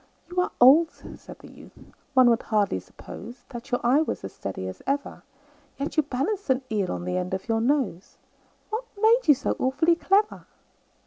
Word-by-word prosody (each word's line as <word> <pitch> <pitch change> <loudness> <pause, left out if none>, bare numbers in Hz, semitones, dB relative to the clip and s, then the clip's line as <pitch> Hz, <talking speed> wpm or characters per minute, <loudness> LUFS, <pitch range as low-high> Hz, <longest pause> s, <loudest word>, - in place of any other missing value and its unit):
"You 360 0 +1
are - - -2
old," 295 +7 +7
said - - -13
the - - -14
youth, - - -16 0.4
"one 255 -1 +7
would 230 - +1
hardly 205 - 0
suppose 235 - -12
That 240 0 -9
your 245 - 0
eye 260 +6 +4
was 320 - -3
as 95 - -7
steady 95 -1 -6
as 95 - -8
ever; 280 +1 -2 0.6
Yet 280 +2 -4
you 310 - +5
balanced 300 +8 -3
an 260 0 +2
eel 200 -4 0
on 175 - -4
the 180 0 -2
end 180 +1 -2
of 190 - -7
your 225 -1 +1
nose 245 - -1 0.5
What 450 +3 -3
made 455 +2 +4
you 295 - +7
so 265 - -2
awfully 280 +6 +2
clever?" 400 +5 +1
260 Hz, 190 wpm, -25 LUFS, 215-320 Hz, 0.6 s, old